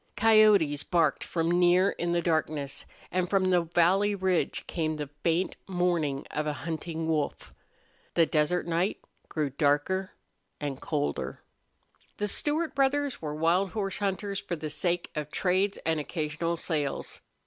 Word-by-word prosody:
Coyotes 210 -9 +5
barked 160 -1 +1
from 165 0 -1
near 180 +2 +5
in 175 0 -1
darkness, 155 -4 -1 0.3
and 180 -1 0
from 190 -2 +2
the 180 -1 +4
valley 180 +5 +3
ridge 185 -2 0
came 155 -2 -2
the 150 -2 -5
faint 170 +2 0
mourn 175 -7 0
of 150 0 -2
a 150 - 0
hunting 165 0 -3
wolf. 155 -2 -2 0.6
The 165 - +5
desert 155 +3 +1
night 170 +4 0 0.3
grew 150 -3 -1
darker 145 +7 +1 0.5
and 140 -3 -4
colder. 145 -2 -2 0.7
The 210 - -1
Stewart 300 +7 0
brothers 280 0 +1
were 150 -2 -4
wild 170 +5 +2
horse 200 -3 -2
hunters 200 0 -2
for 185 -3 -4
the 155 -1 -5
sake 175 +3 -1
of 150 -1 -4
trades 190 +4 +1
and 160 -1 +1
occasional 155 +2 -2
sales. 150 -4 -3
170 Hz, 140 wpm, -28 LUFS, 155-190 Hz, 0.7 s, Coyotes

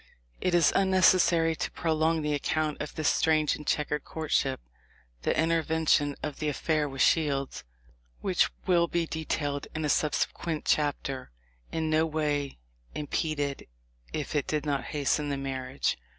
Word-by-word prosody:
"* - - -33
It 180 -1 +2
is 170 -3 +4
unnecessary 185 -4 +4
to - - -3
prolong 160 0 0
the 150 0 0
account 150 +1 -1
of 150 - -6
this 155 -2 0
strange 155 -2 +3
and 150 - -10
checkered 150 -1 0
courtship. 150 -4 -1 0.6
The - - 0
intervention 160 -3 +2
of 150 -2 -4
the 155 - 0
affair 150 +1 0
with 135 -1 0
Shields, 140 -4 +1 0.6
which - - +2 0.2
will 170 -2 +3
be 170 0 0
detailed 150 -3 -3
in 155 0 -1
a - - 0
subsequent 155 +2 0
chapter, 140 -3 0 0.4
in 160 -1 -1
no 160 +1 +3
way 150 -3 -1 0.4
impeded, 145 -1 -2 0.4
if 150 - -4
it 145 -2 0
did 155 0 -1
not 140 -4 -1
hasten 145 0 0
the 140 - -1
marriage. 135 - -2
150 Hz, 150 wpm, -28 LUFS, 145-160 Hz, 0.6 s, is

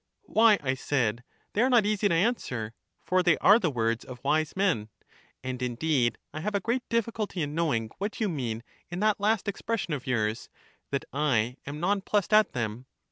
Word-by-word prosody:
Why, 220 - +5
I 130 -1 +1
said, 125 -4 -1 0.3
they 210 - +1
are 255 - +4
not 240 -5 +5
easy 210 -1 +1
to 170 - +2
answer; 130 - -1 0.3
for 185 0 +3
they 175 -3 +3
are 210 +3 +6
the 180 -7 +1
words 115 -3 -1
of 125 -1 -10
wise 155 +2 +1
men: 185 - +1 0.5
and 130 -1 -4
indeed 125 0 +1 0.2
I 155 - -4
have 210 +6 -2
a - - +3
great 235 +6 -1
difficulty 220 -6 -1
in 145 0 -4
knowing 140 -10 0
what 205 +2 -3
you 220 - +1
mean 120 - -3 0.3
in 175 +1 -4
that 215 -1 +2
last 210 +1 +1
ex 200 - -3
pression 225 -8 -2
of 135 -3 -5
yours, 110 -3 -1 0.2
" - - -37
that 140 - -2
I 125 -4 +1
am 145 +2 -5
non 195 +4 +1
plussed 205 +1 0
at 215 -1 +5
them." 115 +1 -3
155 Hz, 200 wpm, -28 LUFS, 125-205 Hz, 0.5 s, are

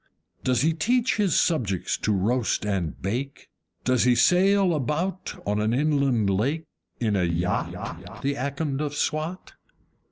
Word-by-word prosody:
Does 125 -1 +2
he 160 +1 +3
teach 235 +11 +1
his 200 -6 +3
subjects 110 - 0
to 110 - 0
roast 105 +3 0
and 95 -6 -2
bake? 125 +8 -4 0.3
Does 130 -1 +2
he 125 0 +4
sail 190 +3 +4
about 160 +6 -2
on 105 +1 0
an 110 +2 +1
inland 140 -6 +2
lake, 130 +12 0 0.4
in 110 -4 +1
a 95 - +2
YACHT, 85 +2 -3
The 140 +1 +1
Akond 140 +1 -2
of 145 -1 -3
Swat? 155 +5 -2
135 Hz, 140 wpm, -25 LUFS, 105-160 Hz, 0.4 s, he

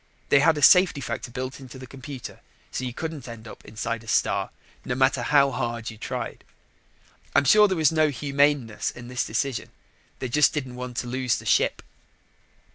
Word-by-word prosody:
They 140 - +6
had 160 +2 +4
a 145 - -2
safety 180 -2 +6
factor 130 - -5
built 130 +2 -5
into 130 0 -11
the 130 - -9
computer 130 0 -9 0.3
so - - -4
you 125 - -3
couldn't 155 0 -6
end 115 -1 -9
up - - -12
inside 115 +1 -4
a - - -16
star - - +1 0.3
no 125 - -3
matter 130 0 +2
how 140 +2 +4
hard 120 -3 -3
you 110 - -12
tried. - - -5 0.9
I'm 140 - +4
sure 210 +7 +7
there 190 -2 -1
was 155 -2 +4
no 155 -1 +3
humaneness 140 -3 0
in 120 0 -10
this 125 0 -1
decision. 125 +3 -2 0.5
They 130 - -4
just 150 +5 +3
didn't 130 -4 -4
want 125 -1 -7
to 125 - -2
lose 130 0 0
the - - -10
ship. - - +2
130 Hz, 190 wpm, -25 LUFS, 120-145 Hz, 0.9 s, sure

